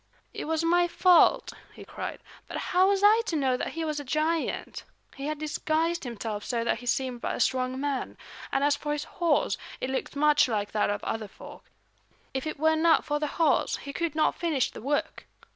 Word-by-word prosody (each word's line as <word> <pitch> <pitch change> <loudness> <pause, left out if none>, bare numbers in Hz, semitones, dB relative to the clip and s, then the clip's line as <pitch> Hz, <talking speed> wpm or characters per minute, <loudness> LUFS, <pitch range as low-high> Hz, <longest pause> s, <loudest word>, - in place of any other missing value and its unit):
"It - - -5
was 320 +1 -1
my 345 +1 +3
fault," 360 0 +4 0.2
he - - -11
cried, - - -6 0.3
"but - - -5
how 370 +1 +2
was 400 0 +1
I 430 +2 +6
to 330 - -1
know 265 -4 +2
that - - -4
he 330 0 -3
was 305 -1 -2
a - - -6
giant? 310 +4 -1 0.3
He 275 +1 -5
had 305 0 -2
disguised 315 +2 -1
himself 220 -3 -4
so 235 0 -1
that 230 - 0
he 245 - -10
seemed 250 -1 -1
but - - -2
a - - -6
strong 255 0 0
man. 280 -2 -3 0.3
And 275 - +1
as 290 0 +3
for 295 +1 -3
his 295 0 -3
horse, 335 -4 0 0.2
it 260 - -3
looks 265 - -3
much 295 0 +4
like 210 -3 -2
that 210 -2 +1
of 205 0 -2
other 220 -1 -3
folk. - - -13 0.7
If 265 +3 -3
it 310 - -4
were 315 +1 +3
not 325 +1 +3
for 295 0 -1
the 300 - -1
horse, 320 -5 +2
he 280 - -8
could 335 -1 -2
not 310 - +3
finish 315 -7 0
the - - -10
work. 285 +4 -2
295 Hz, 210 wpm, -27 LUFS, 255-320 Hz, 0.7 s, I